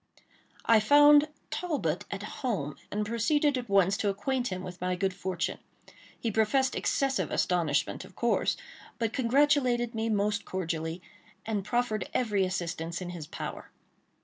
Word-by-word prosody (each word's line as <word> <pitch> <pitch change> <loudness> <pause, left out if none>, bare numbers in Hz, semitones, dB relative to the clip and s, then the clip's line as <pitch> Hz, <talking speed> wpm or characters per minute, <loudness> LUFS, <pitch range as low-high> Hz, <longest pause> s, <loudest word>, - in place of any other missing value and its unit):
I 225 -1 +6
found 290 +5 +7 0.2
Talbot 295 - -2
at 200 0 -5 0.2
home, 175 - -2
and 210 0 -2
proceeded 285 +6 +2
at 245 -3 -4
once 195 -1 +4
to 205 - 0
acquaint 245 +6 -1
him 185 -3 -4
with 180 -1 -8
my 180 0 0
good 190 +1 0
fortune. 180 -2 -3 0.6
He 230 - -1
professed 260 +5 +2
excessive 270 -1 0
astonishment, 165 -5 0
of 185 0 -15
course, 235 - +1 0.4
but 230 -2 -1
congratulated 255 -2 +2
me 225 0 -1
most 205 -1 +1
cordially, 165 -1 -3 0.4
and 215 -3 -1
proffered 230 -2 -1
every 210 -6 +2
assistance 170 -2 -3
in 180 -1 -5
his 165 -4 -7
power. - - -6
210 Hz, 145 wpm, -29 LUFS, 185-245 Hz, 0.6 s, found